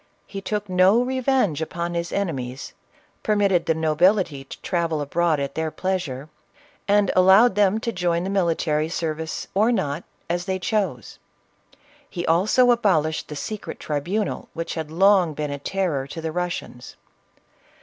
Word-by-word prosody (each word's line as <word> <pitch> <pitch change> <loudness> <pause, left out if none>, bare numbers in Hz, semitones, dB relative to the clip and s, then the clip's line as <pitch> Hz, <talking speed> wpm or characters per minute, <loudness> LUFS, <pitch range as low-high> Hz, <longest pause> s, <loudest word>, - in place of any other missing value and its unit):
He 195 - -7
took 210 +1 -3
no 185 +5 +4
revenge 255 - 0
upon 170 +1 -3
his 170 0 -3
enemies, 135 -9 -3 0.5
permitted 200 -5 +2
the 160 - +2
nobility 160 -1 +2
to 135 - -11
travel 170 -3 -1
abroad 160 +2 +1
at 140 -1 -3
their 160 0 -2
pleasure, 160 -7 -3 0.6
and 205 -1 +3
allowed 190 +5 +6
them 205 +1 +3
to 230 - -2
join 175 -3 0
the 190 - -3
military 165 -5 0
service 160 -2 -3
or 215 +5 +3
not, 170 -8 -1 0.2
as 175 +1 -2
they 190 -1 -1
chose. 185 - -2 0.9
He 175 -3 -4
also 215 +9 +4
abolished 170 -10 +1
the 150 - -7
secret 210 +8 -6
tribunal 175 +8 -2
which 165 0 -4
had 160 -2 -4
long 180 -1 +3
been 150 -1 -3
a 140 - -4
terror 155 -5 -2
to 165 - -7
the 160 0 -3
Russians. 175 -8 -5
175 Hz, 150 wpm, -23 LUFS, 155-200 Hz, 0.9 s, allowed